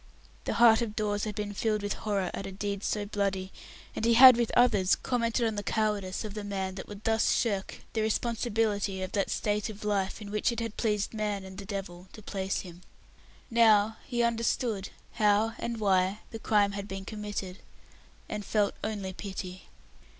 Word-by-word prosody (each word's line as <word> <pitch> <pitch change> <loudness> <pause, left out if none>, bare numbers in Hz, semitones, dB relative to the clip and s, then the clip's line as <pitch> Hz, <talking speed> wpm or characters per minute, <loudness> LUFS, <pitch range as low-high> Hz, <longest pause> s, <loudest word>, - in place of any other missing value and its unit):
The - - -1
heart 230 -1 +6
of 220 -3 -3
Dawes 205 -1 -1
had 210 -1 -4
been 205 -1 -3
filled 215 0 0
with 205 - -1
horror 200 -4 -2
at 195 - -5
a - - -6
deed 200 +1 -4
so 210 -1 -1
bloody, 195 -2 -2 0.4
and - - -3
he 230 0 +4
had, 255 +1 +11
with 235 -1 0
others, 205 -7 +4
commented 235 -1 0
on 220 - 0
the - - 0
cowardice 210 -2 -1
of 210 - -6
the 210 -1 -5
man 190 -2 -3
that 190 - -8
would 205 0 -10
thus 225 0 +2
shirk 200 -5 -1
the 220 - 0
responsibility 215 -3 0
of 185 - -5
that 200 - 0
state 210 0 -1
of 210 0 -8
life 200 -2 0
in 205 -2 -8
which 210 +3 +1
it 235 - -3
had 230 -2 -4
pleased 210 -2 0
man 210 -2 -2
and 190 0 -9
the 200 - -7
devil 190 -3 -6
to 215 - -12
place 195 -1 -2
him. 175 -1 -11 0.7
Now 220 -2 +5
he 240 -2 0
understood 230 -3 0 0.2
how 210 +1 +2
and 235 -1 -3
why 195 0 +2
the 225 - -6
crime 205 -2 +3
had 200 0 -5
been 195 -1 -6
committed, 205 -3 -5 0.7
and 210 -1 -4
felt 205 0 +1
only 200 -3 -3
pity. 185 -2 -7
210 Hz, 190 wpm, -29 LUFS, 195-220 Hz, 0.7 s, had